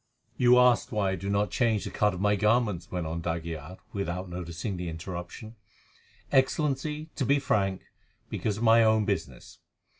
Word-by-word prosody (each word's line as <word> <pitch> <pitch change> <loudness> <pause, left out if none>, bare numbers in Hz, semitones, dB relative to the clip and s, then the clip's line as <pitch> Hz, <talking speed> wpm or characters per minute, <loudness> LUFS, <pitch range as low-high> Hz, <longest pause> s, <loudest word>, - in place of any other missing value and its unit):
"You 125 0 +5
asked 125 0 +4
why 105 -4 0
I - - -1
do 95 +2 -5
not 100 +1 +1
change 115 -4 +1
the - - -5
cut 105 0 +2
of - - -6
my 105 +1 +2
garments," 105 -4 +1
went 90 -2 -3
on 80 +1 -3
d'Aguilar, 85 0 -5 0.2
without 95 -2 -3
noticing 90 +3 -5
the 90 -1 -4
interruption. 90 +6 -7 0.8
"Excellency, 150 +3 0
to 140 - -1
be 140 +3 +3
frank, 100 -8 0 0.4
because 105 -2 -2
of 115 - -4
my 115 0 +6
own 110 -1 +3
business. - - -4
105 Hz, 170 wpm, -28 LUFS, 90-120 Hz, 0.8 s, my